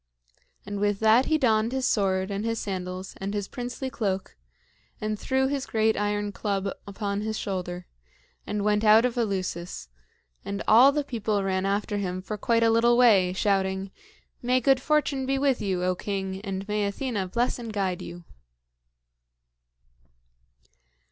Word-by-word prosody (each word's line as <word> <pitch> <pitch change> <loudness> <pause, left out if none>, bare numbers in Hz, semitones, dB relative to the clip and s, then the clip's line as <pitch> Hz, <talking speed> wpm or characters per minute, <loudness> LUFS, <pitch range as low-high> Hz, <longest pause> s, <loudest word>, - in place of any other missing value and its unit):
And 205 0 -4
with 205 -1 +1
that 220 +4 +5
he 315 - +3
donned 225 -5 +2
his 265 -1 0
sword 190 -4 +1
and 200 +1 -2
his 230 0 -1
sandals 185 -1 -5
and 200 +2 -3
his 205 -1 -2
princely 250 +1 -5
cloak, 195 -5 -2 0.6
and 215 -1 -3
threw 265 0 +1
his 275 0 -2
great 220 0 +2
iron 205 0 -1
club 200 -1 -2 0.2
upon 200 0 -3
his 220 0 -3
shoulder, 180 -2 -4 0.6
and 210 -1 -2
went 210 0 +2
out 220 +2 +6
of 250 - -1
Eleusis; 185 - -3 0.5
and 200 +1 -4
all 245 +6 +8
the 295 0 -1
people 215 -6 -1
ran 190 0 0
after 205 +1 -1
him 185 -2 -2
for 210 +3 -4
quite 230 +2 +1
a 225 - +4
little 235 +1 +4
way, 205 -7 +5
shouting, 190 -1 0 0.5
"May 250 +1 +2
good 265 +1 +3
fortune 290 -3 +1
be 270 0 +1
with 270 -2 +1
you, 185 -3 -1
O 185 0 +2
king, 190 0 -4
and 195 -1 -4
may 210 -1 0
Athena 205 -2 -2
bless 240 +7 -1
and 230 -2 -6
guide 190 -4 -1
you!" 175 0 -8
205 Hz, 160 wpm, -26 LUFS, 195-235 Hz, 0.6 s, all